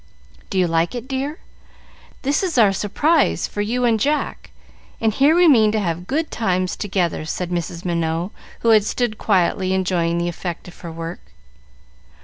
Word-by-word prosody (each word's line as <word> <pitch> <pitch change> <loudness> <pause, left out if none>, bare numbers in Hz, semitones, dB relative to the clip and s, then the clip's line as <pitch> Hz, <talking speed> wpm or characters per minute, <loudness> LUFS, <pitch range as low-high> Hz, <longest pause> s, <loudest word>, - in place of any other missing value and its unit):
"Do 195 - -3
you 185 - +4
like 165 +5 0
it, 240 +1 -6
dear? 275 +3 -3 0.9
This 285 +2 +1
is 360 -7 -1
our 210 -4 +5
surprise 295 - +1
for 205 - -4
you 245 +4 0
and 225 -2 +3
Jack, 295 +7 -1 0.5
and 220 -1 +1
here 280 +7 +4
we 350 0 +5
mean 220 -8 +6
to 220 - +1
have 175 -2 -3
good 310 +4 -1
times 185 -4 0
together," 185 -6 -1
said 175 +3 -4
Mrs. 170 +1 -4
Minot, 170 +1 -1 0.3
who 230 - +2
had 215 -2 +6
stood 215 0 -2
quietly 185 -1 +1
enjoying 175 -3 0
the 170 0 0
effect 175 0 -5
of 175 - -13
her 170 - -7
work. 165 +1 -6
195 Hz, 170 wpm, -21 LUFS, 175-245 Hz, 0.9 s, mean